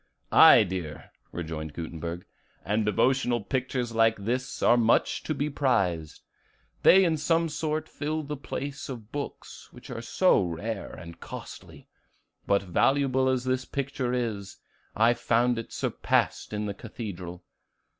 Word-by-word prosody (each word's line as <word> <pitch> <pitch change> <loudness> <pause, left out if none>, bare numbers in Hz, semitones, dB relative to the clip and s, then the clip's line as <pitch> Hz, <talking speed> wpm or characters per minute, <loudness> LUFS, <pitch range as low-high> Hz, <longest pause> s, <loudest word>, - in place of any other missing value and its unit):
"Aye, - - +8
dear," 85 -5 -6 0.2
rejoined 80 -2 -5
Gutenberg, 85 +2 -6 0.4
"and 110 +2 +1
devotional 125 +2 +2
pictures 125 0 -2
like 115 0 +3
this 125 +5 -3
are 120 - +6
much 115 -1 +2
to 155 - -1
be 145 +1 -1
prized; 100 - 0 0.6
they 190 +1 +7
in 160 -2 +1
some 165 +2 +1
sort 155 +1 -2
fill 155 +1 -3
the 150 +1 -4
place 140 0 -6
of 115 -4 -8
books, 145 -1 -7
which - - -12
are 115 -2 -5
so 185 - +3
rare 100 +5 -4
and 85 -1 -10
costly. - - -10 0.6
But 100 0 +2
valuable 130 +7 +2
as 130 -1 0
this 130 0 0
picture 135 -3 -3
is, 110 -6 -3 0.4
I 115 +2 +4
found 120 0 +1
it 115 - -8
surpassed - - 0
in 105 0 -2
the 100 - -3
Cathedral. 95 -5 -8
120 Hz, 140 wpm, -27 LUFS, 100-135 Hz, 0.6 s, Aye